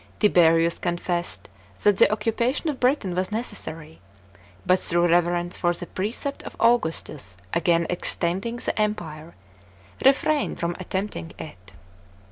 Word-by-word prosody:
Tiberius 165 Hz, -4 st, +4 dB
confessed 175 Hz, 0 st, -2 dB, 0.4 s
that 205 Hz, -2 st, +4 dB
the -, -, +5 dB
occupation 235 Hz, +8 st, 0 dB
of 270 Hz, -, -9 dB
Biitain 250 Hz, -8 st, +1 dB
was 185 Hz, +2 st, -1 dB
necessary, 165 Hz, -, -5 dB, 0.6 s
but, 185 Hz, 0 st, +4 dB
through 175 Hz, -1 st, +2 dB
reverence 175 Hz, +1 st, +1 dB
for 175 Hz, -1 st, +2 dB
the 175 Hz, -, -5 dB
precept 225 Hz, -, -4 dB
of -, -, -9 dB
Augustus 160 Hz, -, 0 dB, 0.2 s
against 170 Hz, 0 st, +2 dB
extending 180 Hz, +5 st, -1 dB
the 245 Hz, -, -2 dB
Empire, 170 Hz, -6 st, -3 dB, 0.7 s
retrained 285 Hz, +2 st, +3 dB
from 170 Hz, 0 st, -1 dB
attempting 190 Hz, -2 st, -4 dB
it. 95 Hz, -, -11 dB
175 Hz, 120 wpm, -24 LUFS, 170-215 Hz, 0.7 s, the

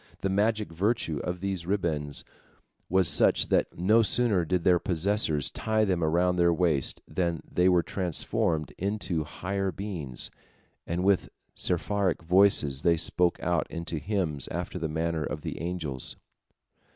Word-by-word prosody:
The 95 Hz, -, 0 dB
magic 105 Hz, +1 st, 0 dB
virtue 90 Hz, -3 st, 0 dB
of 90 Hz, +3 st, -4 dB
these 95 Hz, -3 st, -3 dB
ribands 80 Hz, -7 st, -1 dB, 0.7 s
was 95 Hz, -1 st, +3 dB
such -, -, +4 dB
that -, -, +1 dB
no 105 Hz, +7 st, +4 dB
sooner 110 Hz, -5 st, +3 dB
did 90 Hz, +1 st, 0 dB
their 90 Hz, -2 st, +4 dB
possessors 85 Hz, -, 0 dB
tie 110 Hz, -1 st, 0 dB
them 90 Hz, -4 st, 0 dB
around 90 Hz, +3 st, +2 dB
their 85 Hz, -1 st, +4 dB
waists 85 Hz, -5 st, +1 dB
than 85 Hz, -3 st, -2 dB
they 90 Hz, +1 st, +2 dB
were 90 Hz, -2 st, +3 dB
transformed 80 Hz, -3 st, -1 dB
into 95 Hz, -4 st, -1 dB
higher 95 Hz, +5 st, -3 dB
beings, 85 Hz, -11 st, -6 dB, 0.6 s
and 85 Hz, +2 st, -2 dB
with 100 Hz, -1 st, +2 dB, 0.2 s
seraphic 90 Hz, 0 st, 0 dB
voices 85 Hz, -6 st, +3 dB
they 85 Hz, +1 st, +3 dB, 0.2 s
broke 90 Hz, -1 st, +2 dB
out 85 Hz, -2 st, 0 dB
into 85 Hz, -1 st, -4 dB
hymns 85 Hz, -8 st, -2 dB
after 90 Hz, +1 st, -4 dB
the 80 Hz, -1 st, -2 dB
manner 80 Hz, 0 st, -1 dB
of 75 Hz, +1 st, -4 dB
the -, -, -6 dB
angels. 80 Hz, -7 st, -3 dB
90 Hz, 145 wpm, -27 LUFS, 80-95 Hz, 0.7 s, such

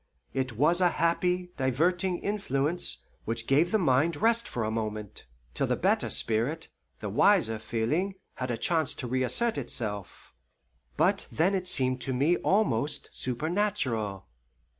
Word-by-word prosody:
It 130 Hz, -2 st, -1 dB
was 155 Hz, +10 st, +3 dB
a 180 Hz, -, +5 dB
happy, 180 Hz, +2 st, 0 dB
diverting 175 Hz, +8 st, +1 dB
influence, 150 Hz, -, -1 dB, 0.2 s
which 115 Hz, 0 st, -3 dB
gave 150 Hz, +8 st, +3 dB
the 220 Hz, -, +4 dB
mind 155 Hz, -2 st, +2 dB
rest 230 Hz, +6 st, +2 dB
for 120 Hz, -, -3 dB
a 110 Hz, -, -1 dB
moment, 110 Hz, -, -5 dB, 0.3 s
till -, -, 0 dB
the -, -, +1 dB
better -, -, +1 dB
spirit, 120 Hz, +9 st, -1 dB, 0.3 s
the -, -, -3 dB
wiser 110 Hz, 0 st, +3 dB
feeling, 140 Hz, -, -1 dB, 0.2 s
had 130 Hz, 0 st, -4 dB
a 120 Hz, -, -1 dB
chance 160 Hz, +4 st, 0 dB
to -, -, -6 dB
reassert 130 Hz, -, +1 dB
itself; 105 Hz, -6 st, -6 dB, 0.6 s
but -, -, +2 dB
then 175 Hz, +5 st, +2 dB
it 185 Hz, -2 st, -1 dB
seemed 130 Hz, -6 st, +1 dB
to 130 Hz, +1 st, -1 dB
me 145 Hz, +7 st, +3 dB
almost 150 Hz, -, +1 dB
supernatural. 130 Hz, -, -1 dB
140 Hz, 140 wpm, -28 LUFS, 115-180 Hz, 0.6 s, a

